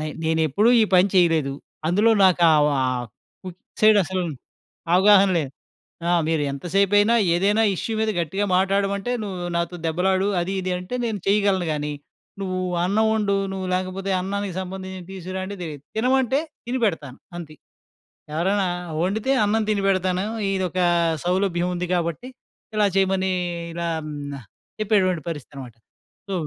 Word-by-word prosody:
నై 155 - -3 0.2
నేనెప్పుడూ 160 - +2
ఈ - - +6
పని 185 +2 +5
చెయలేదు. 165 -6 +3 0.3
అందులో 205 +7 +3
నాకు 180 -2 +4
ఆహ్, 150 -1 +4
ఆహ్, 125 -1 -1 0.4
ఫుడ్ 185 -2 -8 0.2
సైడసలు 200 -4 +4 0.7
అవగాహన 195 +1 +6
లేదు. 145 -5 -3 0.6
ఆ! - - +3 0.2
మీరు 160 -2 +1
ఎంత 140 +3 -8
సేపైనా 205 +3 +4 0.2
ఏదైనా 205 +5 +2
ఇష్యూ 225 - -3
మీద 220 0 +1
గట్టిగా 190 +5 -1
మాట్టాడమంటే, 195 +4 0
నువ్వు 180 -3 -5
నాతో 170 +1 -3
దెబ్బలాడు, 185 +4 +1
అది 185 +3 -2
ఇది 185 0 -2
అంటే 180 +7 -7
నేను 220 -4 -2
చెయగలను 200 -4 +2
గానీ, 150 0 -3 0.5
నువ్వు 185 -1 -2 0.3
అన్నవొండు, 210 +1 +1 0.2
నువ్వు 190 -1 -4
లేకపోతే 185 +1 -3
అన్నానికి 200 0 -3
సంబంధించి 190 0 -7
తీసుకురా 185 0 -5
అంటే 200 +1 -6
తెలీదు. 150 -5 -7
తినమంటే, 260 +3 +2 0.3
తిని 250 +2 -2
పెడతాను 145 -9 -4 0.2
అంతే. 155 -3 -9 0.8
ఎవరైనా 190 +4 +1 0.4
ఒండితే 220 +7 -1
అన్నం 220 +2 +1
తినిపెడతాను. 190 -2 +1 0.3
ఇదొకా 185 -1 0 0.4
సౌలభ్యం 180 -1 0
ఉంది 180 0 -3
గాబట్టి, 170 - -2 0.5
ఇలా 210 -1 +3
చెయమనీ 190 -1 +1 0.4
ఇలా 170 0 -3 0.2
హ్మ్, 150 -1 -6 0.2
న - - -5 0.4
చెప్పేటువంటి 195 -5 +1
పరిస్థితనమాట. 135 -6 -8 0.5
సో - - -2
185 Hz, 135 wpm, -23 LUFS, 170-200 Hz, 0.8 s, ఈ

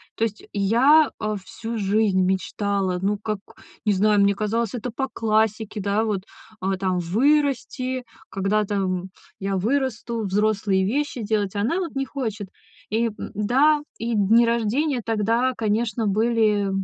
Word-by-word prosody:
То 225 - -1
есть, 215 -1 -2
я, 255 +10 +5
э, 215 0 -1
всю 225 +4 -6
жизнь 200 -1 +2
мечтала, 190 0 0
ну, 205 +2 +1
как, 210 0 -3 0.4
не 210 - +2
знаю, 205 +1 +3
мне 200 0 +3
казалось, 220 +2 -1
это 245 +1 -4
по 265 +4 -2
классике, 220 -1 0
да, 200 +2 +1
вот, 205 -4 -1 0.4
а, 190 0 -1
там 185 -1 0
вырасти, 255 - +1 0.3
когда-то, 205 +1 0
м, 185 -1 -1 0.3
я 195 0 -2
вырасту, 235 +1 -1
взрослые 200 -1 +1
вещи 260 0 -1
делать. 205 -2 -1
Она 230 - 0
вот 345 -6 -4
не 270 0 -1
хочет. 220 -8 -4 0.4
И 230 +2 +1
да, 270 +9 +2 0.2
и 230 +1 -2
дни 220 +3 +5
рождения 235 +4 0
тогда, 230 +4 +1
конечно, 220 +1 0
были 215 -1 +2
215 Hz, 145 wpm, -23 LUFS, 200-235 Hz, 0.4 s, я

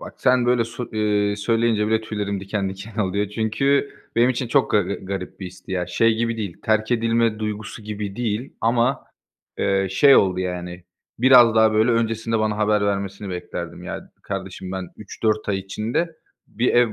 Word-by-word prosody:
Bak - - -9
sen 125 -1 +3
böyle 120 -2 +3
sö 115 +2 -6
ııı, 105 -1 +1
söyleyince 115 0 +1
bile 110 0 +2
tüylerim 105 -3 -3
diken 100 0 -2
diken 100 +3 -10
oluyor 100 0 0
çünkü 135 +7 +1 0.3
benim 120 +2 +5
için 125 -1 -2
çok 135 +2 +2
ga 105 - +4
garip 95 0 -5
bir 95 - -5
histi 90 +1 -10
ya. 90 -2 -1
Şey 115 +5 +2
gibi 115 0 -1
değil, 100 -6 -4
terk 110 0 +1
edilme 115 -1 +1
duygusu 105 +1 -5
gibi 105 -1 -5
değil 120 +2 -2
ama, 120 +3 +1 0.5
eee, 95 0 +1
şey 135 +8 +6
oldu, 95 -2 +3
yani, 90 -1 -5 0.3
biraz 120 -2 +7
daha 110 -1 +5
böyle 110 +3 +3
öncesinde 115 0 0
bana 110 -1 0
haber 105 -1 +2
vermesini 100 0 -3
beklerdim. 85 -1 -6
"Ya, - - -7
kardeşim 95 0 -6
ben, 95 -2 -4
3-4 110 +1 -2
ay 100 - +1
içinde 115 - -3 0.3
bir 120 +3 -1
ev 120 -3 +4
110 Hz, 175 wpm, -22 LUFS, 100-115 Hz, 0.5 s, biraz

